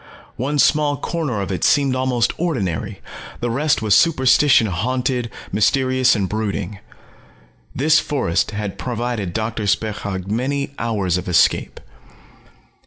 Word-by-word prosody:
One 140 +4 -1
small 145 0 +3
corner 145 -8 -3
of 100 - -4
it 90 -4 -3
seemed 140 -3 +3
almost 130 -2 0
ordinary, 110 - -2 0.4
the 120 -1 -2
rest 145 -1 +1
was 105 -2 +2
superstition 130 0 +4
haunted, 125 +5 -1 0.2
mysterious 130 +4 +2
and 100 -3 -1
brooding. 105 -2 -3 1.0
This 150 +4 +4
forest 130 - -1
had 105 -2 -5
provided 120 -5 -3
Doctor 110 +1 -3
Spechaug 100 -3 -2
many 135 +7 -2
hours 100 -6 0
of 90 - -6
escape. 85 - +2
115 Hz, 120 wpm, -20 LUFS, 100-135 Hz, 1.0 s, superstition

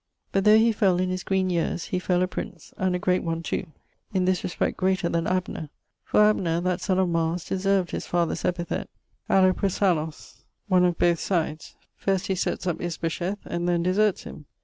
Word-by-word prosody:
But 195 0 +1
though 215 +1 +8
he 225 +1 +4
fell 195 -4 +2
in 185 0 0
his 185 0 -2
green 190 -1 0
yeares, 170 0 -1
he 185 - 0
fell 180 0 +1
a - - +1
prince, 180 -2 -7
and 185 -1 0
a - - +1
great 185 0 +1
one 165 0 -3
too, 185 - -3 0.5
in 185 -1 +2
this 185 0 +1
respect 180 - -1
greater 185 -2 +1
then 165 -1 0
Abner; 180 -4 -2 0.3
for - - +2
Abner, 180 -6 +2
that 180 0 -1
son 185 -1 0
of 190 -1 +3
Mars, 165 0 -1
deserved 195 -1 0
his - - -4
father's 170 -2 0
epithite, 175 -1 -2 0.4
ἀλλοπρόσαλλος, 185 -4 +1 0.3
one 180 -2 +4
of 175 -1 +1
both 170 -1 +3
sides, 160 -4 -2 0.2
first 195 -1 -1
he 195 - 0
setts 185 - -2
up 175 -3 -2
Isbosheth, 175 +3 -3
and 175 +1 -2
then 170 -1 +1
deserts 195 +3 +2
him. 150 - -10
180 Hz, 195 wpm, -25 LUFS, 170-190 Hz, 0.5 s, though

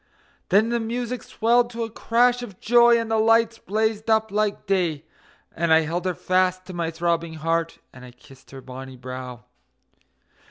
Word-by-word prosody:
Then 210 +4 +4
the 235 0 0
music 240 +1 -3
swelled 240 +2 +1
to 235 -1 -4
a 225 - -6
crash 245 +2 +2
of 205 -6 -9
joy, 235 +1 +5
and 225 -1 -4
the 220 - +2
lights 225 +1 +3
blazed 220 +2 -2
up 220 -1 +2
like 210 0 -1
day, 175 -6 -1 0.5
And 170 0 -1
I 160 0 +6
held 170 +3 -3
her 185 -2 -1
fast 185 +1 0
to 185 - -9
my 170 -2 -2
throbbing 165 0 -2
heart, 165 +1 -1 0.2
and 125 - -13
I 125 - -10
kissed 125 +2 -19
her 135 -1 -10
bonny 130 0 -10
brow. 125 -2 -8
185 Hz, 175 wpm, -23 LUFS, 160-225 Hz, 0.5 s, I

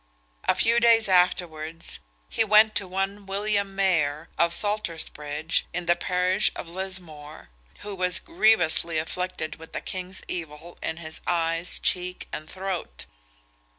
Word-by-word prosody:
A - - +3
few 230 +1 +3
days 230 -2 +5
afterwards, 165 - +1 0.3
he - - +1
went 215 0 +6
to 200 - 0
one 195 +2 -3
William 200 0 0
Maher, 165 -5 +1
of 170 0 +2
Saltersbridge, 165 -6 -1
in 175 0 -2
the 175 0 +4
parish 180 +1 +2
of - - -6
Lismore, 170 - -5 0.3
who 205 0 -6
was 180 -1 +2
grievously 180 - +2
afflicted 165 0 -3
with 160 0 -13
the - - -2
king's 185 0 -6
evil 165 0 -7
in 160 - -3
his 160 -2 -7
eyes, 165 0 +1
cheek, 180 0 +1
and 155 0 -5
throat. 185 - -5
180 Hz, 135 wpm, -26 LUFS, 160-195 Hz, 0.3 s, went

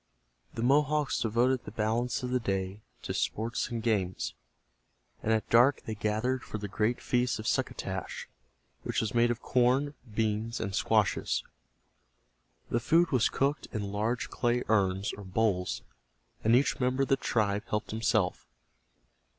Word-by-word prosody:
The 115 - -2
Mohawks 145 +2 +2
devoted 120 +3 +2
the - - -8
balance 115 +3 -1
of 125 - -3
the 125 - +2
day 95 -2 -2 0.2
to - - -3
sports 115 +2 -1
and 115 -2 -4
games, 100 -6 0 0.9
and 110 - 0
at 110 -2 +1
dark 125 +5 +5
they 110 - -4
gathered 110 +5 -1
for 110 - -6
the 105 -1 -5
great 110 +4 0
feast 125 -1 0
of 110 - -7
succotash, 115 -6 -2 0.5
which - - -1
was 110 -3 -1
made 120 0 +4
of 120 -1 -2
corn, 130 +3 +2 0.2
beans 110 +1 -1
and 100 - -3
squashes. 105 +1 +1 1.3
The 120 - +2
food 165 +8 +3
was 125 -5 +3
cooked 140 +2 0
in 100 -3 -3
large 110 +4 -1
clay 120 0 +1
urns, 95 -2 +2
or 100 - -8
bowls, 95 -1 0 0.6
and 115 +2 +5
each 135 +3 +2
member 130 +1 +1
of - - -3
the 135 - +5
tribe 105 -6 0
helped 105 0 -2
himself. 110 -4 0
115 Hz, 150 wpm, -30 LUFS, 105-125 Hz, 1.3 s, dark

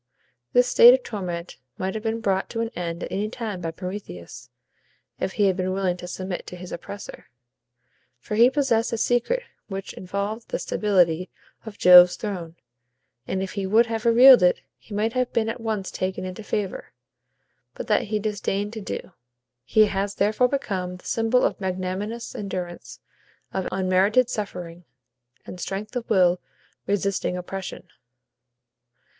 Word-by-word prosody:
This 245 0 +5
state 245 0 +8
of 260 - -6
torment 180 -5 -5 0.2
might 190 +1 -2
have 220 - -4
been 225 +1 -2
brought 195 -2 0
to 230 - -3
an 230 - -1
end 170 -1 -4
at - - -6
any 205 +2 -1
time 220 -6 -5
by 165 - -2
Prometheus, 125 - -8 0.7
if 190 - -2
he 205 - +2
had 190 -2 +3
been 185 0 -1
willing 190 -2 0
to 180 - -8
submit 185 0 -5
to - - -7
his 180 0 -9
oppressor; 200 +4 -8 0.9
for 125 - -8
he 235 +3 +6
possessed 260 -5 +1
a 230 - -1
secret 245 - +1 0.2
which 195 -1 -6
involved 200 +5 -4
the - - -1
stability 180 -4 +1 0.4
of 210 - -8
Jove's 180 0 +8
throne, 180 -6 -5 0.7
and 190 0 -1
if 190 - -5
he 200 -2 -3
would 225 +4 +5
have 225 0 -3
revealed 245 +1 +8
it, 180 0 +3 0.2
he 210 - -10
might 220 +2 0
have 255 -1 0
been 225 -1 +1
at 235 +1 -5
once 215 -4 -3
taken 185 0 -3
into 185 +3 -6
favor. 205 -2 -4 0.8
But - - -6
that - - +2
he 215 0 -1
disdained 205 0 -2
to 220 - -6
do. 195 - -6 0.5
He 215 0 +5
has 200 0 -2
therefore 215 +5 +2
become 195 -10 -3
the - - -20
symbol 225 +2 +2
of - - 0
magnanimous 190 +5 -3
endurance 180 -4 -6 0.5
of 190 - -2
unmerited 190 +6 +2
suffering, 180 -4 -5 0.6
and 180 - -9
strength 205 +6 -5
of 245 -2 -4
will 180 -3 +3 0.5
resisting 200 -2 0
oppression. 190 +1 -6
200 Hz, 160 wpm, -24 LUFS, 185-225 Hz, 0.9 s, state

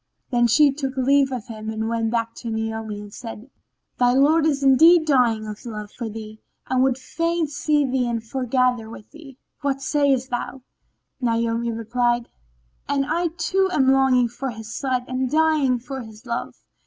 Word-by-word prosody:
Then 240 -1 +3
she 285 +5 +5
took 270 -1 -4
leave 270 +1 +3
of 250 -4 -4
him 220 -2 -7
and 220 0 -3
went 230 -1 -1
back 230 0 -1
to 235 - -6
Naomi 220 -1 -4
and 205 0 -11
said, 230 +1 -9 0.5
"Thy 245 0 +4
lord 300 +4 +4
is 280 -2 0
indeed 315 +5 +6
dying 240 -7 +2
of 210 -1 -8
love 210 -3 -7
for 235 -2 -6
thee 215 0 -9 0.3
and 255 0 +1
would 260 -1 +2
fain 335 +5 -1
see 295 0 0
thee 255 -1 0
and 235 -1 -1
foregather 250 -1 0
with 220 -2 -12
thee. 295 -5 -13 0.2
What 275 -1 -1
sayest 275 -2 +1
thou?" 245 +1 -4 0.6
Naomi 230 -1 0
replied, 240 +1 -1 0.6
"And 280 -1 +1
I 335 +4 0
too 380 +3 0
am 265 -5 +3
longing 265 -2 +4
for 245 +3 -5
his 225 -1 -8
sight 255 -3 -1
and 255 0 -2
dying 305 -4 +2
for 265 +2 -7
his 220 0 -13
love." 235 -1 -4
255 Hz, 175 wpm, -23 LUFS, 230-275 Hz, 0.6 s, indeed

